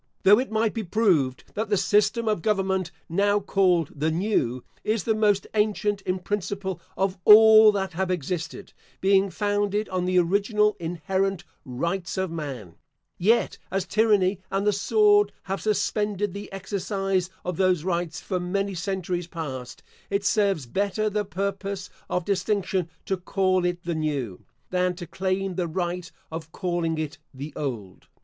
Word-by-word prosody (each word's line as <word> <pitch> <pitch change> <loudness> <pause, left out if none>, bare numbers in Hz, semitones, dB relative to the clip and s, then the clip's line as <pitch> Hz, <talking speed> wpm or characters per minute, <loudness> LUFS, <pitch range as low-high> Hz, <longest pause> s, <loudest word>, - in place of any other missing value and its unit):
Though 205 +3 +7
it 260 - -2
might 220 0 +1
be 225 - -3
proved 170 - +1
that 215 0 -3
the 205 - +2
system 210 +4 +2
of 210 -5 +1
government 190 -3 0 0.2
now 205 +4 +2
called 185 -5 +2
the 150 +2 0
New, 160 - 0 0.2
is 215 0 0
the 225 - +2
most 210 -2 +2
ancient 210 -1 +1
in 185 -1 -1
principle 190 -1 -3 0.2
of 190 -1 0
all 220 0 +9
that 190 -2 -2
have 185 +2 -1
existed, 170 -1 -4 0.3
being 195 0 +3
founded 205 +1 0
on 185 -1 -1
the 185 0 +1
original, 205 +4 +2
inherent 175 +3 -1 0.2
Rights 170 +10 -3
of 190 -2 -1
Man: 135 - -6 0.4
yet, 225 +7 +2
as 190 0 -1
tyranny 205 -4 +2
and 195 +1 -1
the 210 - +3
sword 205 +1 +4
have 195 +1 -3
suspended 210 -2 0
the 200 +1 -7
exercise 195 -1 -2 0.2
of 180 -2 -3
those 185 -4 +2
rights 170 -2 -2
for 185 - -3
many 195 +3 -1
centuries 180 -1 -3
past, 130 -8 -6 0.3
it 200 0 -1
serves 195 - +2
better 200 - -1
the 210 0 -1
purpose 195 0 -4 0.2
of 180 -2 -1
distinction 190 -2 0 0.2
to 190 - -1
call 185 0 +1
it 175 0 -2
the 170 - -2
new, 145 - -3 0.3
than 180 0 +1
to 175 -1 -7
claim 190 +2 -2
the 175 -1 -1
right 175 +1 -3 0.2
of 160 0 -6
calling 175 -3 -1
it 155 -1 -4 0.2
the 140 +4 -7
old. 115 -10 -5
190 Hz, 155 wpm, -25 LUFS, 175-205 Hz, 0.4 s, all